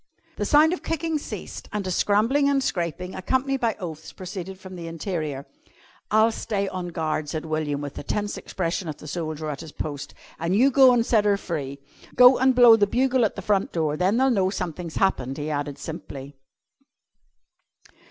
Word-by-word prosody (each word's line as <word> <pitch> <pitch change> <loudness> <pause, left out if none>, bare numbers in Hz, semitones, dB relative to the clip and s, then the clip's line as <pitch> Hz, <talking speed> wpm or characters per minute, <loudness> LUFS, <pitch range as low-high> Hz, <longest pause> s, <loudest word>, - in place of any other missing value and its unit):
The - - -1
sound 310 +3 +5
of 365 - -4
kicking 325 -1 -2
ceased - - -8
and 210 -2 -3
a 185 - -2
scrambling 230 +10 +2
and 275 -1 +2
scraping, 180 - -2
accompanied 265 +7 0
by 230 -3 0
oaths, 160 -4 -7
proceeded 185 0 -7
from 185 -1 -10
the 170 -2 -7
interior. 160 -5 -4 0.6
"I'll 220 +2 +4
stay 200 -3 -2
on 185 -2 -4
guard," 155 -3 -2
said 155 0 -4
William 155 -2 -2
with 145 -1 -5
the - - -7
tense 205 +7 -2
expression 180 0 -3
of 155 - -5
the 155 - -11
soldier 155 -1 -4
at 140 - -6
his 160 -2 -9
post, 145 -2 -6 0.2
"an' 170 +3 0
you 260 +6 +5
go 265 -1 +7
an' 240 -2 +3
set 220 -3 +2
her 200 -1 +3
free. 145 -8 -4 0.4
Go 250 +1 +8
an' 260 0 +4
blow 245 -2 +8
the 205 -2 +2
bugle 255 +2 +2
at - - -2
the 195 - -6
front 200 -1 +1
door, 155 -3 0
then 185 +7 +1
they'll 265 +1 +3
know 190 -5 +2
something's 180 -3 -5
happened," 135 -9 0
he 150 +1 -3
added 145 -1 -3
simply. 145 -4 -8
185 Hz, 190 wpm, -24 LUFS, 155-230 Hz, 0.6 s, Go